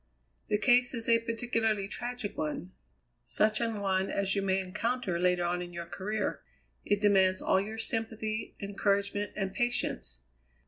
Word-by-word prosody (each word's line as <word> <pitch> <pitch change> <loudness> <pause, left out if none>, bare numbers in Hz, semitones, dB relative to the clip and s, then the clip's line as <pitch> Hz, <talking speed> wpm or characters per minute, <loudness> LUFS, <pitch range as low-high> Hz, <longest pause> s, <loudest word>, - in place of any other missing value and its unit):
"The 210 - +2
case 245 +2 +4
is 230 -1 -2
a 230 -1 +5
particularly 225 -3 0
tragic 240 0 -4
one, 155 +4 -3 0.5
such 215 +1 +1
an 230 -2 -1
one 190 -1 +1
as 195 -1 0
you 200 - +1
may 190 -1 +1
encounter 195 0 -1
later 180 0 +2
on 175 +1 0
in 175 0 -7
your 170 0 -5
career. 205 +5 -3 0.4
It 205 0 +1
demands 190 -2 +4
all 190 - +2
your 215 +2 -5
sympathy, 225 -1 -2
encouragement, 200 0 0
and 195 -2 -2
patience. 240 - -1
205 Hz, 150 wpm, -30 LUFS, 190-225 Hz, 0.5 s, a